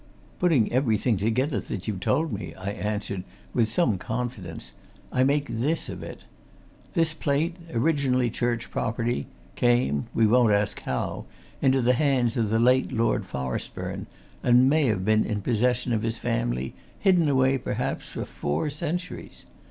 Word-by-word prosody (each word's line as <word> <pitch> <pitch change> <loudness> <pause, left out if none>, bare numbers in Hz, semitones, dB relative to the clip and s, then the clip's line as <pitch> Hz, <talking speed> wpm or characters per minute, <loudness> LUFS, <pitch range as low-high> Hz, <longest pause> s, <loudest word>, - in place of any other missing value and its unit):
"Putting 155 -13 +3
everything 120 -2 +2
together 115 +5 +1
that 95 +1 -6
you've 105 -4 -2
told 155 - +1
me," 100 - -5
I 95 +1 -4
answered, 105 -2 -3 0.3
with 115 -3 +2
some 115 - +2
confidence, 110 -7 -5 0.4
"I 130 - +3
make 140 +2 +2
this 140 +9 0
of - - -6
it. - - -8 0.7
This 165 -2 +2
plate, 155 +2 0 0.2
originally 130 -2 +2
church 120 0 -2
property, 115 - -1 0.3
came 120 - +2
we 115 - +4
won't 115 0 +5
ask 100 0 +1
how - - -3 0.4
into 130 -1 +3
the 125 +2 +4
hands 125 -3 +2
of 115 -4 +1
the 110 - +2
late 125 +3 +3
Lord 115 +1 +1
Forestburne, 65 -1 -4 0.3
and 125 +1 +5
may 150 +2 +3
have 95 -5 0
been 110 +1 +4
in 105 -2 -3
possession 125 +2 +1
of 110 - +1
his 115 0 -1
family, - - -1 0.2
hidden 180 -6 +3
away, 130 0 +3
perhaps, - - -3
for - - -5
four 75 - -2
centuries. 170 +4 -5
120 Hz, 150 wpm, -26 LUFS, 105-135 Hz, 0.7 s, won't